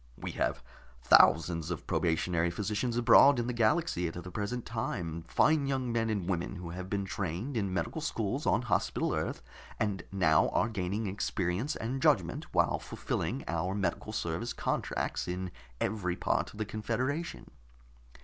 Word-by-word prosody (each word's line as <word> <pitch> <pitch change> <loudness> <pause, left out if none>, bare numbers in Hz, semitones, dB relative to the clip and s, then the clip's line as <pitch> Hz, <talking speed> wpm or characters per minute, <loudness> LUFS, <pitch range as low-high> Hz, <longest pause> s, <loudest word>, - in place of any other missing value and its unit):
We - - -5
have - - -1 0.4
thousands 80 +4 +5
of 85 - -4
probationary 85 0 +1
physicians 105 +6 -2
abroad 120 +3 +7
in 120 - 0
the 125 - -2
galaxy 115 - +2
at 80 - -6
the 90 +1 -7
present 110 +5 -3
time, 85 -8 -3
fine 150 - +3
young 130 -3 -1
men 115 -1 0
and 100 -5 -1
women 90 +1 -1
who 85 -2 -6
have 90 +2 -6
been 100 -1 -1
trained 95 - -3
in 100 -4 0
medical 100 - -2
schools 120 -1 -2
on 125 - +3
Hospital 100 -7 0
Earth, 65 - -2 0.4
and 105 -4 0
now 80 -5 +4
are 110 - +1
gaining 100 +1 -2
experience 100 +6 -1
and 130 +4 -3
judgment 140 - +2
while - - +2
fulfilling - - -3
our 85 +3 -1
medical 100 +2 -2
service 110 +4 -2
contracts - - -2
in 90 +1 -3 0.3
every 90 -5 -1
part - - 0
of - - -14
the 110 - -1
confederation. 125 +10 -3
100 Hz, 160 wpm, -31 LUFS, 90-120 Hz, 0.4 s, abroad